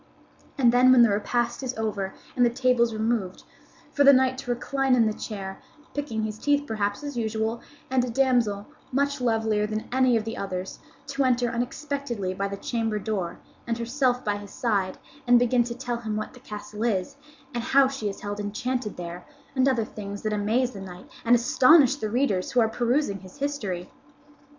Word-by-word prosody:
And 245 -4 +5
then 250 +1 +6
when 250 -2 +8
the 230 - +4
repast 240 +4 0
is 260 -2 -4
over 205 -3 -2 0.2
and 245 - +3
the 240 - +5
tables 245 -1 +2
removed, 220 -4 -1 0.5
for 285 - +3
the 280 - +9
knight 260 -1 +4
to 265 - -8
recline 265 +2 +1
in 235 -2 +4
the 215 - +1
chair, 195 -3 -6 0.3
picking 275 -7 -2
his 215 0 -4
teeth 285 +2 +2
perhaps 205 0 -2
as 285 -2 -5
usual, 220 0 -1 0.3
and 260 -1 +3
a 250 - -2
damsel, 235 -5 +1 0.3
much 280 +1 0
lovelier 220 -3 +1
than 215 0 -4
any 255 -2 +4
of 220 - -2
the 225 +1 -4
others, 185 -1 -4 0.3
to 280 0 -1
enter 245 -2 +2
unexpectedly 245 -4 -3
by 195 +1 -2
the 200 0 -5
chamber 225 0 -1
door, 195 -5 -3 0.3
and 230 -1 -1
herself 250 +1 0
by 205 -1 0
his 205 -1 -10
side, 200 -6 -1 0.3
and 245 0 +7
begin 245 0 +3
to 235 0 -5
tell 245 -1 -3
him 220 -2 -4
what 215 - -4
the 250 - -14
castle 210 -2 -7
is, 195 -6 0 0.4
and 240 - -2
how 270 +2 +5
she 260 -6 -3
is 195 - -8
held 205 0 -4
enchanted 210 +3 -3
there, 175 0 -6 0.3
and 265 +1 +4
other 235 -4 +1
things 205 -1 -7
that 215 -1 -1
amaze 225 +5 +1
the 195 - -9
knight 180 -1 -10 0.2
and 235 +1 +5
astonish 265 +3 +5
the 215 -6 -3
readers 215 -6 0
who 250 - +4
are 225 - +4
perusing 240 -2 0
his 185 +4 -14
history. 215 -12 -3
235 Hz, 195 wpm, -26 LUFS, 210-255 Hz, 0.5 s, the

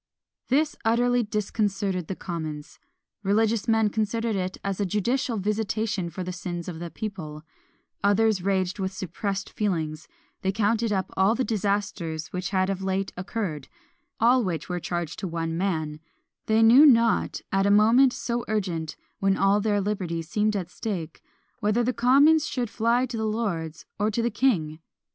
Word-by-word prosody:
This 295 +4 +2
utterly 245 +2 +3
disconcerted 200 -4 -1
the 190 - -4
commons. 155 -5 -6 0.4
Religious 215 +2 +1
men 225 -2 +3
considered 220 +1 -1
it 185 -1 -2
as 195 -1 -2
a - - +2
judicial 230 +5 0
visitation 210 -2 -1
for 180 +3 -5
the 180 0 -5
sins 175 -1 -5
of 170 -3 -6
the 170 0 -5
people; 160 -7 -6 0.6
others 205 0 +3
raged 190 0 0
with 190 0 -1
suppressed 195 +1 -4
feelings; 160 -7 -2 0.3
they 190 - +1
counted 220 +2 +1
up 190 -2 -1
all 195 +4 +3
the 260 - 0
disasters 200 -7 -2
which 180 0 -3
had 185 -1 +1
of 195 -1 -2
late 190 0 -2
occurred, 180 -6 -4 0.5
all 245 +2 +4
which 165 -7 -3
were 180 -1 -2
charged 175 -1 -4
to 190 - -3
one 165 -1 -3
man: 160 -5 -2 0.5
they 220 +1 +4
knew 240 +6 +8
not, 230 -6 +4
at 195 +1 +2
a - - +3
moment 225 +6 +6
so 240 -1 -3
urgent, 175 -7 -2 0.2
when 195 0 +2
all 200 +1 +3
their 205 -1 +1
liberties 185 -5 -2
seemed 210 +4 +1
at 180 -3 -3
stake, 180 -8 -5 0.4
whether 215 +2 +1
the 250 +2 0
commons 280 +7 +5
should 245 -5 -3
fly 235 +3 +2
to 245 -2 -5
the 220 - -2
lords, 185 -8 -3
or 210 +1 +2
to 230 +2 -1
the 235 - 0
king. 170 -11 +1
200 Hz, 165 wpm, -26 LUFS, 180-225 Hz, 0.6 s, knew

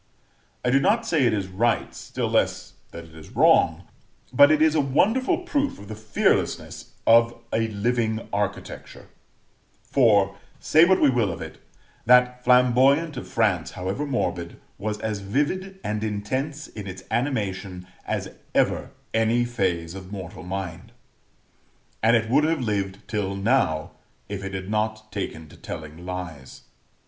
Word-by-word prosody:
I 125 - +3
do 135 - +5
not 225 +11 +2
say 155 - +2
it - - +2
is 100 -2 -1
right, 110 +5 0
still - - -4
less - - 0 0.2
that 85 - -9
it 80 -1 -16
is 80 0 -13
wrong, - - +4 0.5
but 145 +3 +7
it 155 -1 +4
is 155 0 +4
a 155 - +3
wonderful 225 - +2
proof 290 -5 -1
of 100 - -12
the - - -5
fearlessness 110 -1 -1
of 115 +1 +5
a 115 0 +1
living 110 +1 -1
architecture; 100 -1 -4 0.7
for, 100 -7 +3 0.2
say 160 +2 +5
what 190 +1 +4
we 145 - +5
will 115 -6 +1
of 85 - -7
it, - - -8 0.5
that 125 0 +5
Flamboyant 130 +5 +4
of 125 - -6
France, 100 -9 0
however 95 +11 -3
morbid, 90 -10 -2 0.2
was 105 0 -2
as 110 -2 -2
vivid 150 - -2
and 105 0 -2
intense 130 +9 -3
in 105 -2 -9
its 95 0 -8
animation 100 -8 -2 0.2
as - - -2 0.3
ever - - +1 0.2
any 115 +2 +2
phase 90 -8 -1
of 95 0 -9
mortal 95 -4 -7
mind; 95 -1 -6 1.1
and 115 +2 +4
it 110 -1 +1
would 140 +6 +3
have 160 -2 +1
lived 100 -4 -3
till 100 -2 -2
now, 100 -7 +1 0.4
if 100 -1 -5
it 95 0 -5
had 95 0 -5
not 110 0 -2
taken 80 -6 -5
to - - -16
telling 80 +3 -8
lies. 85 -7 -7
110 Hz, 155 wpm, -24 LUFS, 95-130 Hz, 1.1 s, but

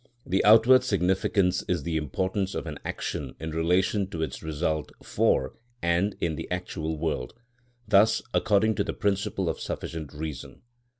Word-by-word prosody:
The 95 +2 +1
outward 115 +4 +7
significance 95 -3 +1
is 85 -5 0
the 85 +1 -2
importance 95 +6 -1
of - - -3
an 75 -3 -6
action 70 -4 -4
in 80 0 -5
relation 90 +5 +1
to 85 -4 -4
its - - -5
result 80 0 -2
for 65 0 +1 0.3
and 85 +3 +1
in 80 -2 -1
the - - -6
actual 85 -3 -3
world; 75 -1 -3 0.5
thus 110 +3 +4
according 110 +1 +3
to - - +2
the - - -3
principle 100 -1 -1
of - - -2
sufficient 80 -3 -5
reason. 75 -2 -7
90 Hz, 155 wpm, -27 LUFS, 80-100 Hz, 0.5 s, outward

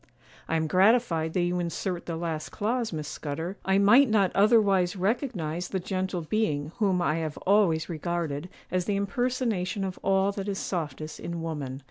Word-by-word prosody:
'I - - +1
am 160 0 +1
gratified 185 -2 +3
that 180 - +1
you 175 +1 0
insert 175 +1 -3
the 165 - -2
last 160 -2 -3
clause, 230 +2 -1
Miss 155 -3 -4
Scudder; 160 +7 -5
I 190 0 +2
might 225 +7 +6
not 200 -4 +2
otherwise 200 -3 +4
recognize 185 - -1
the 190 - -2
gentle 185 -1 -2
being 155 -5 -1
whom 190 -4 +2
I 155 -1 +1
have 155 -2 -3
always 185 -5 +3
regarded 170 -1 -3 0.2
as 185 -1 0
the 205 - 0
impersonation 210 -2 -1
of 190 -1 -4
all 195 0 +2
that 200 0 -5
is 195 - -2
softest 155 -4 -4
in 170 -1 -5
woman. 140 -5 -4
180 Hz, 170 wpm, -27 LUFS, 160-200 Hz, 0.2 s, might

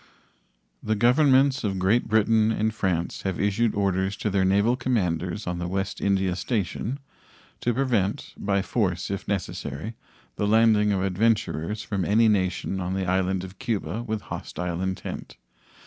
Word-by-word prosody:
The 110 - 0
Governments 135 +3 +4
of 100 -3 -1
Great 95 +6 +2
Britain 110 0 +3
and 110 0 0
France 90 -5 -1
have 95 -2 -3
issued 105 +3 +1
orders 95 0 0
to 105 - -2
their 95 -1 +2
naval 100 +6 +3
commanders 100 -7 -1
on 90 -1 -3
the 85 - -3
West 95 +2 -3
India 95 -2 +1
station 110 +5 -2 0.6
to 120 - 0
prevent, 115 -6 0
by 100 -1 0
force 95 -6 -1
if 100 - -4
necessary, 100 - -3 0.4
the 105 - 0
landing 110 -1 +4
of 95 -2 0
adventurers 100 -1 0
from 100 -3 -2
any 110 +5 +4
nation 95 -2 0
on 90 +1 -2
the 95 -1 -1
island 95 0 0
of 95 0 -10
Cuba 105 -2 -2
with 110 -2 -3
hostile 90 -3 -5
intent. 95 0 -5
100 Hz, 150 wpm, -25 LUFS, 95-110 Hz, 0.6 s, Governments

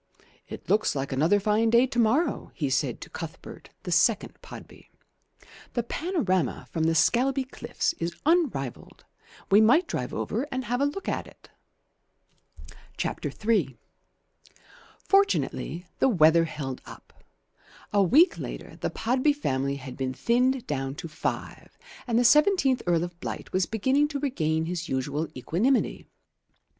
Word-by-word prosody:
"It - - -9
looks 215 -5 +2
like 135 0 -3
another 160 +10 +3
fine 215 +3 +2
day 235 +2 +5
to 245 -2 -3
morrow," 235 +9 +1
he - - -2
said - - -1
to - - -9
Cuthbert, - - -9
the - - -5
second - - +2
Podby. - - -12 0.8
"The 240 - 0
panorama 230 - -1
from 160 -1 0
the 165 0 +2
Scalby 265 - +2
cliffs 260 - -3
is 170 +1 -3
unrivalled. 290 - -1 0.5
We 205 +2 +7
might 300 +11 +4
drive - - -3
over 260 +6 -2
and 260 -1 -3
have 245 +2 -1
a - - +4
look 390 +7 -6
at - - -2
it." - - -19 1.5
III 210 - -1 1.3
Fortunately 390 - +1
the 270 - +4
weather 165 -5 +5
held 135 -5 -6
up. - - -13 0.8
A 205 - +4
week 285 - +4
later - - -7
the - - -2
Podby 255 +6 +1
family 140 - -1
had 130 -2 -8
been 130 -1 -3
thinned 250 - +1
down 135 - -3
to 165 - -7
five, 150 - -5 0.3
and 230 -2 +1
the 245 - +3
seventeenth 300 -1 +4
Earl 170 -1 +2
of 175 0 -7
Blight - - -6
was 185 -1 +1
beginning 260 +7 +2
to 290 -1 -4
regain 160 - -1
his 175 0 -4
usual 145 +4 -2
equanimity. 195 - 0
215 Hz, 145 wpm, -26 LUFS, 160-265 Hz, 1.5 s, We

